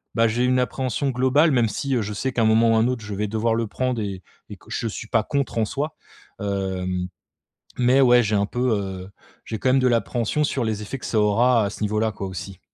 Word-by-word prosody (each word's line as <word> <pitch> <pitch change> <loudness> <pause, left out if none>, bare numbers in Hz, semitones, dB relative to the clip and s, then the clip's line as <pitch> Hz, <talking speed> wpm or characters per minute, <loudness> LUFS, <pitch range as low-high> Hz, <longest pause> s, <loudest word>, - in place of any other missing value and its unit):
bah, 115 0 +4
j'ai 120 +3 0
une 125 0 +3
appréhension 130 +2 -1
globale 130 +6 +3
même 120 -4 +2
si, 135 +4 -2
heu, 120 - +1
je 105 0 -4
sais 130 +6 -2
qu'à 115 - 0
un - - +3
moment 115 +1 +4
ou - - +3
un 110 - +3
autre 125 -2 -2
je 105 - -5
vais 105 +1 -1
devoir 110 +2 0
le 115 -1 -1
prendre 125 +1 -2
et 95 -3 -5 0.3
et - - -9
que - - -21
je 115 - -2
suis 110 +1 -6
pas 110 -1 +1
contre 140 -3 -2
en 115 - +3
soi, 145 +7 -3 0.5
hem, 95 -2 -2 0.7
mais 125 +2 +4
ouais, 125 -2 +6
j'ai 105 0 0
un 100 0 +2
peu, 125 +2 -1
heu, 95 -1 -5 0.4
j'ai 110 - -5
quand 130 - +1
même 130 - +4
de 130 - +3
l'appréhension 120 +3 0
sur 135 -3 -1
les 110 -1 -2
effets 105 +6 -5
que - - -8
ça 110 - +1
aura 115 +2 +3
à - - -1
ce - - -10
niveau-là, 110 +1 0
quoi, 100 -1 -6
aussi. 95 0 -7
115 Hz, 250 wpm, -23 LUFS, 105-125 Hz, 0.7 s, ouais